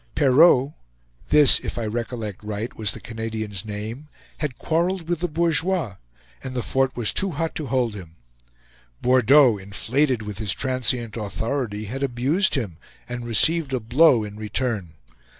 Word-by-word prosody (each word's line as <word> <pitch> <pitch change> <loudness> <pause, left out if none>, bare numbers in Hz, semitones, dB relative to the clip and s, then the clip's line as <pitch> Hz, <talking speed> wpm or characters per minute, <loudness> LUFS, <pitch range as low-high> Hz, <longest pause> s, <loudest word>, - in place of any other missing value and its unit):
Perrault 140 0 +5 0.6
this, 150 -2 +7
if - - -6
I 115 - -2
recollect 110 -2 -5
right 105 +2 -5
was 105 -3 -1
the - - -9
Canadian's 110 -4 -5
name 110 +7 -6 0.3
had 145 -5 -3
quarreled 170 +1 -1
with 175 -2 -1
the 175 - -1
bourgeois, 165 - 0 0.5
and 130 -1 -6
the 125 - -1
fort 135 0 0
was 115 -3 +1
too 195 - +1
hot 165 0 -3
to 155 - -4
hold 125 -3 0
him. 85 -5 -10 0.9
Bordeaux, 125 -1 +5
inflated 120 +6 0
with 105 -1 -7
his 105 -4 0
transient 125 -3 -1
authority, 110 +1 -3
had 130 +6 -5
abused 140 +9 +1
him, 105 - -3 0.3
and 120 -1 -6
received 150 +5 +2
a 130 - +1
blow 120 +1 +4
in 105 0 -8
return. 105 -6 -3
125 Hz, 150 wpm, -23 LUFS, 110-145 Hz, 0.9 s, this